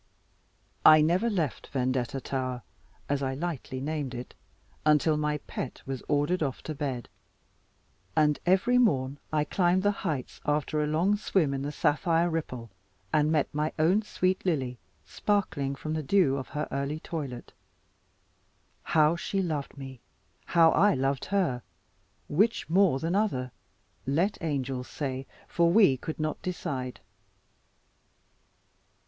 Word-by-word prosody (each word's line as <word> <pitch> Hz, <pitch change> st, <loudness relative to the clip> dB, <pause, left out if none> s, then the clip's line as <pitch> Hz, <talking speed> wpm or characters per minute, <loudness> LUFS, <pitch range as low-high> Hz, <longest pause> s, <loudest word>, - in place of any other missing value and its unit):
I 155 Hz, 0 st, +9 dB
never 180 Hz, +9 st, +2 dB
left 165 Hz, -, -2 dB
Vendetta 130 Hz, -1 st, -1 dB
tower, 130 Hz, -2 st, -3 dB, 0.4 s
as 140 Hz, -1 st, 0 dB
I 135 Hz, -1 st, -1 dB
lightly 145 Hz, -4 st, -4 dB
named 145 Hz, -2 st, -3 dB
it, 120 Hz, +1 st, -7 dB, 0.5 s
until 150 Hz, +1 st, +4 dB
my 150 Hz, 0 st, 0 dB
pet 130 Hz, -, -6 dB
was 135 Hz, -2 st, -4 dB
ordered 145 Hz, +5 st, +1 dB
off 135 Hz, -4 st, -2 dB
to 155 Hz, -, -4 dB
bed; 135 Hz, -5 st, -3 dB, 1.1 s
and 150 Hz, -2 st, +3 dB
every 195 Hz, +8 st, +3 dB
morn 140 Hz, -, +2 dB
I 150 Hz, -1 st, +2 dB
climbed 180 Hz, +3 st, +2 dB
the 205 Hz, -, +4 dB
heights, 150 Hz, -10 st, -4 dB
after 150 Hz, +1 st, 0 dB
a -, -, -1 dB
long 175 Hz, +7 st, +2 dB
swim 175 Hz, -8 st, +1 dB
in 135 Hz, -, -2 dB
the 145 Hz, +1 st, -3 dB
sapphire 165 Hz, +3 st, +2 dB
ripple, 125 Hz, -9 st, -4 dB, 0.4 s
and 150 Hz, 0 st, +3 dB
met 155 Hz, -3 st, +1 dB
my 150 Hz, +1 st, -1 dB
own 175 Hz, +7 st, +3 dB
sweet 185 Hz, -3 st, -1 dB
Lily 130 Hz, -9 st, -1 dB, 0.3 s
sparkling 155 Hz, -10 st, -1 dB
from 155 Hz, +3 st, -4 dB
the 155 Hz, -, -1 dB
dew 150 Hz, -2 st, +3 dB
of 135 Hz, -2 st, -4 dB
her 150 Hz, 0 st, -3 dB
early 140 Hz, +3 st, -2 dB
toilet. 140 Hz, -7 st, -6 dB, 1.3 s
How 155 Hz, +1 st, +3 dB
she 195 Hz, +3 st, -2 dB
loved 155 Hz, -7 st, -2 dB
me, 135 Hz, -3 st, -9 dB, 0.4 s
how 165 Hz, -2 st, +5 dB
I 205 Hz, -1 st, +4 dB
loved 135 Hz, +1 st, 0 dB
her; 180 Hz, -11 st, 0 dB, 0.7 s
which 210 Hz, +10 st, +1 dB
more 180 Hz, -3 st, +4 dB
than 165 Hz, +5 st, -2 dB
other 185 Hz, -12 st, 0 dB, 0.6 s
let 170 Hz, +10 st, +1 dB
angels 135 Hz, -5 st, -2 dB
say; 135 Hz, -2 st, -4 dB, 0.2 s
for 170 Hz, -1 st, +2 dB
we 190 Hz, -9 st, +6 dB
could 155 Hz, +5 st, -6 dB
not 155 Hz, 0 st, -2 dB
decide. 130 Hz, -8 st, -4 dB
150 Hz, 140 wpm, -28 LUFS, 135-175 Hz, 1.3 s, I